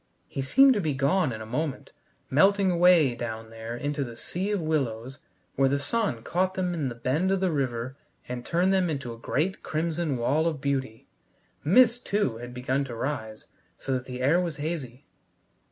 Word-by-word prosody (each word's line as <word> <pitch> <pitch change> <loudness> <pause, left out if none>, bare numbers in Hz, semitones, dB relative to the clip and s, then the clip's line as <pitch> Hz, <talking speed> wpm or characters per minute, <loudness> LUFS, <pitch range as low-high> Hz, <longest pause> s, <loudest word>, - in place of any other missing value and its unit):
He 135 - -4
seemed 270 - +6
to 210 - 0
be 155 -5 -1
gone 140 +3 +2
in 110 -1 -6
a - - -6
moment, 130 +4 -3 0.4
melting 195 +6 +4
away 170 -6 +5
down 115 -2 -6
there 115 +1 -6
into 145 +1 -2
the 120 -3 -8
sea 190 +3 -3
of 205 -1 0
willows 135 -5 -2 0.4
where 135 0 +3
the 140 - +1
sun 140 - -1
caught 185 +5 0
them 180 -1 -1
in 150 -6 -1
the 120 - -7
bend 140 +10 0
of 195 0 +2
the 185 -2 +1
river 130 -3 -2 0.3
and 125 0 -5
turned 180 +6 +2
them 185 -2 +2
into 135 -6 -3
a - - -11
great 165 +10 -1
crimson 160 -2 -1
wall 145 +7 +1
of 155 -4 -2
beauty. 135 -5 -2 0.6
Mist, 240 - +5
too, 200 - 0
had 120 +1 -8
begun 130 +2 -1
to 120 -3 -7
rise, 115 -4 -4 0.3
so - - -5
that 130 0 -2
the 125 -1 -5
air 155 +7 +4
was 170 -4 -2
hazy. 145 -5 -5
140 Hz, 190 wpm, -27 LUFS, 125-175 Hz, 0.6 s, seemed